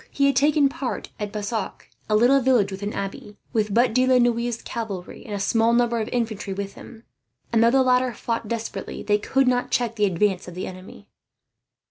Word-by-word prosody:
He 280 - +1
had 280 - +3
taken 290 +2 +4
part 270 -1 -5
at 205 -1 -4
Bassac, 215 +2 -4 0.2
a 215 - +3
little 250 +5 +5
village 240 -6 +3
with 190 +1 -7
an 205 +1 -3
abbey, 200 +1 -6 0.2
with 215 -3 0
but 235 +2 +3
De 255 +1 +3
la 260 -1 +5
Noue's 240 -1 +1
cavalry 205 -6 -6
and 210 - -4
a - - -3
small 225 +3 +2
number 235 -1 +2
of 215 - -3
infantry 220 -5 -2
with 200 0 -5
him; 230 -1 -13 0.5
and 225 0 +4
though 230 - +6
the 265 +2 +4
latter 255 0 +3
fought 230 0 -3
desperately, 230 0 -5
they 210 0 +2
could 265 +5 +1
not 250 0 +1
check 235 -2 -1
the 210 - +3
advance 190 0 0
of 175 - -9
the 185 - -4
enemy. 185 +1 -11
230 Hz, 205 wpm, -23 LUFS, 205-245 Hz, 0.5 s, though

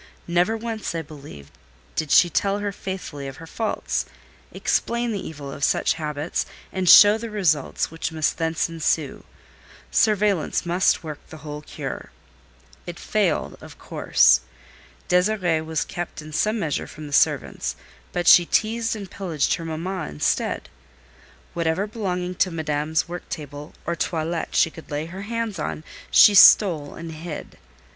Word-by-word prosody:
Never 175 +6 +2
once, 225 -5 -4
I 165 - -2
believe, 140 - -12 0.4
did 155 - -2
she 175 - +6
tell 195 +4 0
her 205 0 -2
faithfully 185 -8 -6
of 135 - -8
her 165 - -10
faults, 220 +6 -2 0.4
explain 235 0 -1
the 200 -3 -3
evil 140 -3 -7
of 140 - -7
such - - +2
habits, 150 -1 -3 0.3
and 185 -2 0
show 210 +1 +9
the 230 0 -6
results 170 -12 0
which 165 0 -4
must 155 0 -1
thence 160 0 0
ensue. 160 -3 -1 0.7
Surveillance 205 -6 +2
must 180 +1 +2
work 155 -2 -6
the 155 -1 -12
whole 150 0 -6
cure. - - -7 0.8
It - - -6
failed - - -1
of - - -12
course. - - +3 0.7
Désirée 180 -3 +2
was 160 0 -2
kept 175 -1 -6
in 155 0 -10
some 215 +8 +1
measure 160 -8 -2
from 155 - -10
the 145 - -8
servants, - - +1 0.4
but 175 - -2
she 175 -1 +8
teased 225 +1 0
and 200 -2 -7
pillaged 170 -7 -1
her 165 - -4
mamma 170 +4 -4
instead. 75 0 -1 0.9
Whatever 170 +3 0
belonging 185 -5 -3
to 185 - +4
Madame's 155 -1 -1
work 175 +1 -8
table 145 -1 -7
or 170 - -1
toilet 165 0 -2
she 165 - +4
could 160 - -13
lay 150 +1 -3
her 185 +4 -8
hands 225 -2 -3
on, 155 0 -4 0.3
she 210 - +7
stole 170 -7 +6
and 165 -1 -7
hid. 160 0 -8
170 Hz, 150 wpm, -23 LUFS, 155-195 Hz, 0.9 s, show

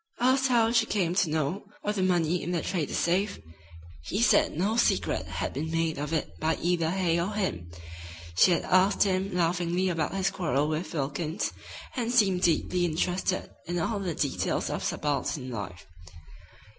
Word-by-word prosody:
Asked 260 +2 +3
how 230 -3 +3
she 230 -1 +3
came 180 -5 0
to 185 -3 +2
know 160 +6 -1 0.2
of 210 - 0
the 195 - 0
money 175 -2 +2
in 175 - -3
the 170 - -1
trader's 170 -6 -2
safe, 190 +4 +1 0.6
he 70 - -3
said - - +3
no 200 +6 +1
secret 235 - +1
had - - -3
been 160 +2 -3
made 165 -2 -1
of 150 +1 -3
it 160 -2 -3
by 160 0 +1
either 170 -1 +1
Hay 175 -2 +1
or 190 +5 -2
him. 90 - -2 0.7
She 90 - +6
had 170 - +2
asked 185 +2 +4
him 190 0 0
laughingly 175 +1 +1
about 165 +1 -1
his 190 0 +1
quarrel 150 -7 0
with 155 +3 -3
Wilkins, 150 +5 -2 0.4
and 240 -3 -1
seemed 195 -7 +3
deeply 175 +1 +2
interested 180 +3 -1 0.2
in 175 +1 -2
all 200 +5 -1
the 180 -5 -3
details 145 -3 -1
of - - -3
subaltern 140 -2 -2
life. 95 -6 -6
175 Hz, 170 wpm, -28 LUFS, 160-190 Hz, 0.7 s, She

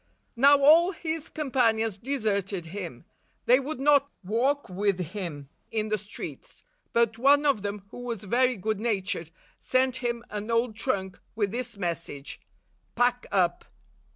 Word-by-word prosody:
Now 280 +4 +7
all 325 +6 +6
his 320 -2 -4
companions 225 -8 +1
deserted 200 -8 -1
him. 170 -8 -7 0.4
They 250 +2 +6
would 275 0 -5
not 280 0 +4
walk 255 +9 0
with 195 +1 0 0.2
him 165 -9 -5 0.2
in 215 -1 -2
the 215 - +1
streets; 205 +1 -9 0.3
but 230 -1 +2
one 285 +3 +5
of 275 -8 +3
them, 205 0 -4
who - - -9
was 235 -4 -5
very 250 +5 +2
good 215 +1 -2
natured, 195 -7 -1 0.3
sent 255 0 +1
him 235 -1 -3
an 210 +1 -5
old 230 -1 +1
trunk 200 -5 -2 0.2
with 205 -3 0
this 240 -1 -3
message, 170 -6 -4 0.5
"Pack 245 +1 +1
up!" 175 -3 +1
225 Hz, 145 wpm, -27 LUFS, 200-260 Hz, 0.5 s, Now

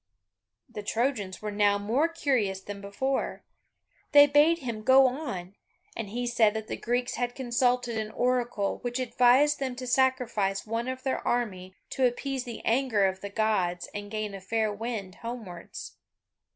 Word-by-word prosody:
The 235 -4 -7
Trojans 215 -3 -2
were 210 - -2
now 205 0 +3
more 230 +10 +1
curious 260 - 0
than 200 +1 -8
before. 265 +7 -2 0.7
They 290 0 +10
bade 295 +3 +4
him 235 -8 -5
go 265 +4 +6
on, 245 - -3 0.4
and 225 -3 -5
he 245 +4 -3
said 230 -3 +3
that 220 -1 -3
the - - -3
Greeks 245 +1 -1
had 245 0 -2
consulted 245 -2 +1
an 215 -1 -3
Oracle, 240 -3 0
which 245 0 -3
advised 255 +4 +4
them 260 -2 -2
to 255 0 -6
sacrifice 240 -6 +1
one 230 +2 -2
of 260 0 -4
their 265 - 0
army 190 -6 -2 0.2
to 260 -1 +3
appease 265 +1 -3
the 235 -2 -8
anger 230 -4 +2
of 190 0 -1
the 200 - -5
Gods 200 -5 0
and 205 0 -6
gain 215 -1 -3
a 195 - -7
fair 215 +2 0
wind 205 -4 -5
homewards. 225 -8 -7
235 Hz, 165 wpm, -28 LUFS, 205-255 Hz, 0.7 s, They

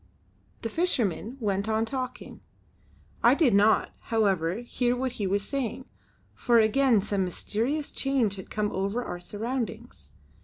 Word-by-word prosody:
The 225 - -2
fisherman 250 - -1
went 200 -2 -1
on 220 +1 +1
talking. 255 0 -6 0.8
I 240 +3 +6
did 285 - +3
not, 210 +2 +4
however, 195 -7 +1
hear 245 0 0
what 255 +1 -1
he 210 -5 -3
was 200 +1 -1
saying, 265 -2 -3 0.5
for 240 -1 +2
again 225 +1 +4
some 200 -1 -1
mysterious 235 - -2
change 255 -8 0
had 190 - -9
come 210 -1 -1
over 200 +6 -2
our 175 - -5
surroundings. 225 +4 -5
225 Hz, 140 wpm, -27 LUFS, 200-255 Hz, 0.8 s, I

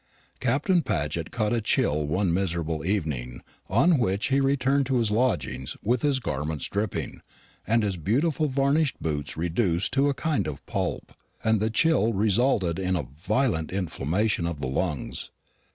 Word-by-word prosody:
Captain 155 - +2
Paget 80 - -2
caught 110 -2 -1
a 115 - +1
chill 75 -7 +1
one 85 +3 +1
miserable 85 -4 -1
evening 75 -10 -2 0.3
on 140 - +4
which 100 +1 0
he 135 +1 +3
returned 135 0 +2
to 135 - 0
his 115 -3 +1
lodging 85 - 0 0.2
with 120 +2 +1
his 140 -3 +2
garments 75 - -3
dripping, 100 -1 -3 0.5
and 115 0 +3
his 100 -3 -1
beautiful 140 - +1
varnished 140 +2 +1
boots 75 -3 -3
reduced 85 +2 0
to 140 +2 +3
a 140 - 0
kind 160 0 0
of 70 -2 -6
pulp; - - -3 0.3
and 110 -1 +3
the 110 +2 +1
chill 115 -2 +3
resulted 100 -3 +2
in 95 -1 0
a 85 - -1
violent 90 - 0
inflammation 90 +1 0
of 85 -4 -4
the 70 - -3
lungs. 75 +2 -3
105 Hz, 155 wpm, -26 LUFS, 80-130 Hz, 0.5 s, on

